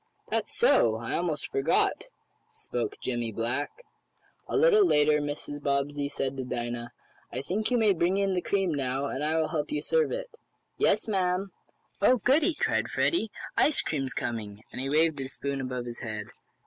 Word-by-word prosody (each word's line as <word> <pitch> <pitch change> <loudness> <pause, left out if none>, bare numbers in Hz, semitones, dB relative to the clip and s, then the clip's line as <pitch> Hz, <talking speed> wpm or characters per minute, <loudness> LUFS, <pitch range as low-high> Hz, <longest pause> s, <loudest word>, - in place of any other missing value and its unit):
"That's - - -2
so 120 - +4
I 115 +1 -4
almost 170 -3 -1
forgot," 135 +5 +1 0.4
spoke 415 -1 -4
Jimmie 120 -2 -1
Black. 120 +6 -1 0.8
A - - 0
little 430 -1 +6
later 150 - +4
Mrs. 145 0 -4
Bobbsey 140 0 0
said 135 -1 -2
to 130 - -2
Dinah: 120 -1 -4 0.4
"I 130 +3 -4
think 205 +8 -1
you 250 - +2
may 215 -3 +4
bring 175 +2 +1
in 195 -1 +1
the 180 - 0
cream 195 -3 0
now, 135 -1 -1
and 140 0 -3
I 155 +2 +1
will 160 -1 +1
help 150 -2 -2
you 150 -1 -1
serve 475 -1 +2
it." - - -4 0.5
"Yes, - - +2
ma'am." 190 -1 0 0.5
"Oh, 255 - +5
goodie!" 295 - +3
cried - - 0
Freddie. 280 -10 +1 0.3
"Ice 300 - +3
cream's 135 -4 -2
coming!" 110 -3 -4
and - - -3
he 135 - -2
waved 155 0 +3
his 135 0 -3
spoon 140 -1 -2
above 125 -1 -4
his 120 -1 -5
head. 110 -3 -4
145 Hz, 175 wpm, -28 LUFS, 130-195 Hz, 0.8 s, little